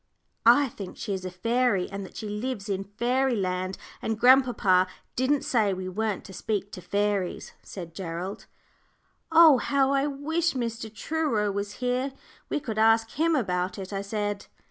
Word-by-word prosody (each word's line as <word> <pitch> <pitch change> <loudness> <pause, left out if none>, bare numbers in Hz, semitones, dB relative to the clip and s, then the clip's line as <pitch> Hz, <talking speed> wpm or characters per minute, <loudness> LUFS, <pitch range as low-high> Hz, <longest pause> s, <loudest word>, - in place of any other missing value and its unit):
"I 270 +4 +7
think 195 -5 -9
she 205 - -3
is 185 -1 -4
a - - -2
fairy, 230 +1 +1
and 200 0 -5
that 190 - -11
she 215 - -5
lives 210 0 -4
in 195 -1 -1
Fairyland; 205 -5 0 0.2
and 220 -1 -2
grandpapa 245 -8 +5 0.3
didn't 265 +3 +1
say 210 -6 +2
we 185 0 -5
weren't 210 +2 -2
to 190 - -10
speak 205 +1 -3
to 180 - -8
fairies," 200 -1 -1
said 170 -4 -9
Gerald. 180 +3 -5 0.8
"Oh! 320 -5 +8
how 275 0 +2
I 275 +1 +2
wish 315 +4 -1
Mr. 230 -3 -3
Truro 230 -5 -1
was 200 +1 -3
here; 250 +3 -1 0.4
we - - 0
could 225 -6 -4
ask 225 0 +4
him 325 +3 +1
about 180 -7 -1
it," 195 0 -7
I 195 - -2
said. 205 0 -3
215 Hz, 165 wpm, -27 LUFS, 195-255 Hz, 0.8 s, Oh